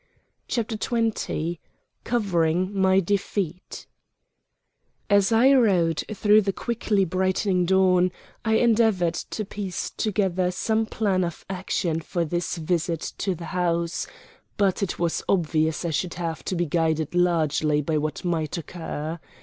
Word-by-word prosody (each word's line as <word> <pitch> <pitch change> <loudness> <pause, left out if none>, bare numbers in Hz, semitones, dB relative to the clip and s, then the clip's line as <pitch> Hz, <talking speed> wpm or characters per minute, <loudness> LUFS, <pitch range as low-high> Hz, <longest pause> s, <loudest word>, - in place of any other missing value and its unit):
CHAPTER 225 -2 -2
XX 215 -8 -1 0.5
COVERING 185 -5 +1
MY 190 0 +4
DEFEAT 190 -2 -3 1.3
As 200 0 +4
I 245 +5 +6
rode 185 - +3
through 210 0 +4
the 195 -1 0
quickly 215 -2 0
brightening 185 0 +1
dawn 185 -1 +4 0.3
I 220 -1 +2
endeavored 220 -7 +3
to 215 +4 -4
piece 195 -2 -4
together 190 -4 0
some 220 +4 0
plan 195 -4 0
of 170 -2 -5
action 180 -3 -1
for 170 +1 -2
this 175 +3 -2
visit 165 0 -1
to 190 -2 0
the 170 0 -8
house; 170 -1 0 0.5
but 195 -2 +2
it 195 - -2
was 170 -1 0
obvious 160 -2 +1
I 170 - -1
should 170 +3 -2
have 165 -2 -4
to 185 - -2
be 175 0 0
guided 160 -1 0
largely 155 -4 +2
by 155 +1 0
what 155 +4 -4
might 165 -1 -1
occur. 165 -1 -5
180 Hz, 135 wpm, -25 LUFS, 165-200 Hz, 1.3 s, I